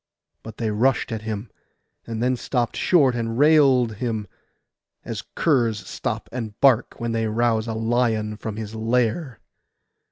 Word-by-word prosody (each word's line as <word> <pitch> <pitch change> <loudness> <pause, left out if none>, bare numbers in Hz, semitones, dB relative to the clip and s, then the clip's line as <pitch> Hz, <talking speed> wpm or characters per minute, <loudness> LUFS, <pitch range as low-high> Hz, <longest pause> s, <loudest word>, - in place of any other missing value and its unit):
But 110 -1 -10
they 110 -2 -1
rushed 120 +4 +1
at 110 -1 -3
him; 110 0 -5 0.6
and 115 0 -3
then 130 +1 +2
stopped 120 -1 -2
short 145 -8 +3
and 115 -1 -3
railed 135 -7 +4
him, 110 -3 -3 0.8
as - - -4
curs 115 - +1
stop - - -4
and 115 -3 -6
bark 130 -4 +4
when 115 0 -2
they 115 -1 0
rouse 110 0 +1
a 110 - -3
lion 110 -2 0
from 110 0 -6
his 110 0 -6
lair. 115 +4 -1
115 Hz, 150 wpm, -23 LUFS, 110-125 Hz, 0.8 s, railed